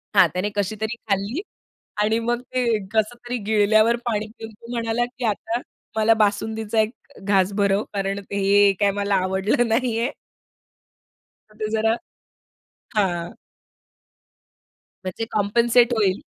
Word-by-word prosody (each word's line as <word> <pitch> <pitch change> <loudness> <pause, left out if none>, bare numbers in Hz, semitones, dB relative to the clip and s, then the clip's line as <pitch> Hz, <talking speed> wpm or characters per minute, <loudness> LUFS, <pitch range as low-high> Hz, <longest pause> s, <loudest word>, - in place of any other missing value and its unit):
हां, - - +7
त्याने 185 +3 -1
कशीतरी 215 +3 -2
खाल्ली 200 - 0 0.6
आणि 220 +2 +2
मग 240 +1 -1
ते 250 0 -2 0.3
कसं 220 +2 +1
तरी 245 +1 -1
गिळल्यावर 215 +2 +4
पाणी 215 -3 -1
पिऊन 225 0 -7
तो 230 +3 -13
म्हणाला, 230 0 0
की 245 +1 -10
आता 225 +2 -1 0.4
मला 220 +1 +5
बासुंदीचा 220 +1 0
एक 215 +3 -1 0.3
घास 195 -1 +2
भरव, 200 0 +2
कारण 195 0 -1
ते - - -2
हे 200 +1 +5
काय 200 -1 +3
मला 200 0 0
आवडलं 190 +7 +1
नाहीये. 235 +2 +1 1.4
हां, 210 - -22
ते 215 - -2
जरा 225 +1 +2 1.0
हां. 175 -4 0 1.7
म्हणजे 185 +4 -4
कॉम्पेन्सेट 235 +4 +3
होईल. 200 -4 +1
215 Hz, 130 wpm, -23 LUFS, 200-230 Hz, 1.7 s, हां